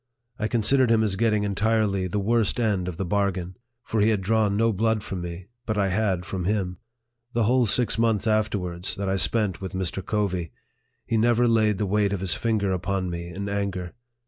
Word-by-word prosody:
I 105 - 0
considered 120 +3 +3
him 115 -1 +4
as 105 -3 0
getting 105 0 +1
en 100 - -1
tirely 105 -3 +1
the 90 - -3
worst 110 +3 +1
end 100 -6 0
of 90 -3 -5
the 95 - -2
bargain; 95 -2 -1 0.3
for 110 - -1
he 105 - +4
had 110 -3 +2
drawn 105 0 +1
no 115 0 +2
blood 110 +1 0
from 95 -2 -5
me, 85 +2 -7 0.2
but 110 -1 -1
I 100 -1 +2
had 95 -3 0
from 90 0 -4
him. 95 -3 -1 0.5
The 115 - +1
whole 125 +2 +3
six 115 0 +2
months 115 -3 +2
afterwards, 100 -5 0
that 100 0 -3
I 95 0 +1
spent 100 -2 +1
with 95 - -6
Mr. 95 0 -3
Covey, 95 -6 -2 0.5
he 115 - 0
never 120 +2 +3
laid 110 -3 +3
the 105 - -1
weight 100 0 +1
of 100 - -2
his 95 -2 +2
finger 110 -4 0
upon 95 0 -2
me 85 0 -5
in 100 +3 -5
anger. 100 -3 -3
100 Hz, 205 wpm, -25 LUFS, 95-110 Hz, 0.5 s, him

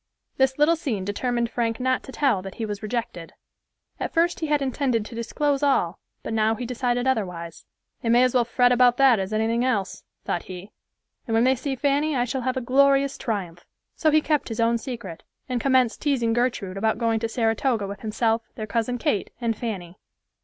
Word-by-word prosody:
This 265 0 +2
little 300 +3 +4
scene 230 - -3
determined 235 +3 -1
Frank 230 -2 -1
not 255 0 +1
to - - -9
tell 260 -9 +1
that 195 0 -8
he 225 - -3
was 205 -1 -5
rejected. 215 -6 -4 0.7
At - - -3
first 340 +1 +1
he 320 - -2
had 295 -1 +2
intended 260 -4 0
to 235 - -10
disclose 275 +5 -1
all, 280 -2 +1 0.2
but - - -4
now 220 0 +2
he 245 - -5
decided 245 0 -1
otherwise. 180 -10 -2 0.4
"They 230 - -2
may 240 +2 +5
as 255 - +2
well 250 -2 +4
fret 245 +1 +3
about 245 0 +4
that 265 -5 +5
as 190 +1 -3
anything 225 +2 +1
else," 210 -7 -1 0.2
thought 175 - -2
he, 185 +2 -9 0.6
"and 225 - 0
when 225 - +4
they 260 +1 +4
see 265 +2 -3
Fanny, 285 +3 +1
I 245 -1 +1
shall 255 +2 -3
have 255 +1 -1
a - - -1
glorious 275 +2 +3
triumph." 180 -7 -4 0.3
So 315 - +2
he 310 0 +4
kept 300 -3 0
his 225 - -5
own 230 0 +2
secret, 225 - -7 0.3
and 250 -2 -2
commenced 260 -3 +2
teasing 250 -6 +1
Gertrude 230 -6 -1
about 220 +2 +1
going 225 -1 +1
to 230 0 -2
Saratoga 225 -1 0
with 200 0 -7
himself, 225 +1 0
their 215 - -4
cousin 230 +3 -1
Kate 210 -4 -1
and 230 -2 -1
Fanny. 190 -7 -6
235 Hz, 205 wpm, -24 LUFS, 220-260 Hz, 0.7 s, may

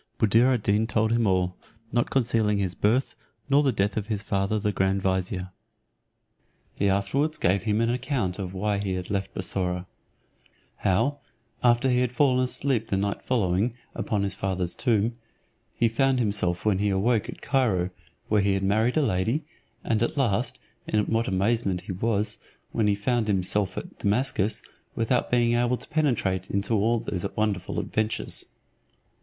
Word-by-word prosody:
Buddir 115 +4 +4
ad 120 -5 0
Deen 105 +2 +2
told 110 -1 +1
him 115 -1 +2
all, 90 -1 +1 0.4
not 120 0 +1
concealing 115 -5 +1
his 95 -3 -1
birth, 115 +8 +1 0.4
nor 140 +1 +6
the 140 -3 +2
death 100 -2 0
of 105 -1 -2
his 105 -2 -2
father 100 +1 0
the 105 0 0
grand 95 0 0
vizier. 95 0 -1 1.2
He 100 - +1
afterwards 115 +11 0
gave 95 +4 +1
him 105 0 +1
an 115 0 +2
account 125 -7 -2
why 100 +2 -2
he 95 -2 -2
had 90 0 -5
left 100 -1 -2
Bussorah; 90 -1 -2 0.9
how, 140 +10 +1 0.4
after 120 +1 +4
he 125 -1 +3
had 125 -1 +1
fallen 130 -1 +3
asleep 125 -2 0
the 95 - 0
night 100 +1 -1
following 110 -1 0 0.2
upon 105 -2 -1
his 100 - -1
father's 95 -2 -1
tomb, 115 -1 +1 0.6
he 115 - +3
found 130 +4 +2
himself 100 -6 +1
when 100 -3 +2
he 105 0 +1
awoke 105 +3 +1
at - - -9
Cairo, 100 -10 +1 0.4
where 105 -1 +3
he 100 0 +2
had 95 - -2
married 110 +7 +2
a 155 - +4
lady; 115 - 0 0.4
and 110 -1 0
at 120 - -1
last, 115 -8 0 0.3
in 105 - +1
what 115 +1 0
amazement 95 -1 0
he 95 - -7
was, 105 +2 -1 0.3
when 110 -2 +1
he 100 - +3
found 115 +2 0
himself 100 0 +1
at - - -7
Damascus, 105 -1 0 0.3
without 115 +2 +1
being 120 -1 +3
able 120 +1 +2
to 125 - -10
penetrate 105 - 0
into 100 +3 -1
all 110 +3 +2
those 90 -5 -4
wonderful 105 -4 -1
adventures. 110 0 -2
105 Hz, 165 wpm, -26 LUFS, 95-120 Hz, 1.2 s, nor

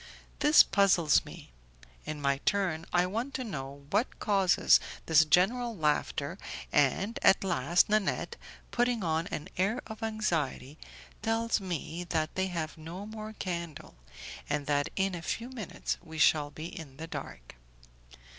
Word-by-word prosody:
This 300 +1 +7
puzzles 185 -7 +4
me. - - -11 0.6
In 155 -1 -4
my 140 -1 +1
turn, 175 -3 0
I 175 0 +3
want 230 +9 -3
to 260 - -2
know 140 - -7
what 235 - 0
causes 195 -4 +4 0.3
this 160 -1 +6
general 225 +8 +2
laughter, 150 +1 -1 0.3
and 165 - +2
at 195 - +5
last 175 -2 +2
Nanette, 210 -2 0 0.4
putting 245 -3 +1
on 160 0 0
an 150 - -5
air 200 +7 +1
of 220 +1 -9
anxiety, 165 -10 -2 0.4
tells 225 0 0
me 175 -2 -4
that 155 -1 0
they 190 0 0
have 165 -3 -4
no 170 +5 -7
more 215 0 -7
candle, 170 -6 -5 0.6
and 145 0 -1
that 145 0 +1
in 195 0 +1
a 175 - -5
few 235 +8 -3
minutes 235 -8 -4
we 160 -2 -9
shall 150 -1 +4
be 155 +2 -8
in 150 -5 -9
the 160 - -6
dark. - - -8
175 Hz, 145 wpm, -30 LUFS, 155-215 Hz, 0.6 s, This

